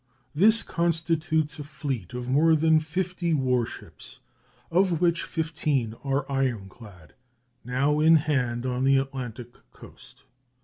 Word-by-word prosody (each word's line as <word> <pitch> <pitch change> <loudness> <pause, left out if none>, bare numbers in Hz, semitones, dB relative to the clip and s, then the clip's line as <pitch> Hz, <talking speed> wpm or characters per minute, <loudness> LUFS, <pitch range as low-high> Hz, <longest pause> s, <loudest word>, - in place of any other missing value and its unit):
This 215 +8 +4
constitutes 165 -2 -1
a - - -4
fleet 140 - -5
of 125 0 -5
more 155 +5 +4
than 160 0 +4
fifty 170 +1 -2
war 125 -4 +1
ships, - - -12 0.5
of 175 -1 +2
which 170 -1 +2
fifteen 150 -7 -2
are 135 0 -1
ironclad, 110 - -4 0.5
now 140 +5 0
in 160 +2 +6
hand 130 -6 0
on 125 0 -1
the 135 0 +4
Atlantic 125 -3 -5 0.2
coast. - - -15
145 Hz, 125 wpm, -26 LUFS, 125-160 Hz, 0.5 s, in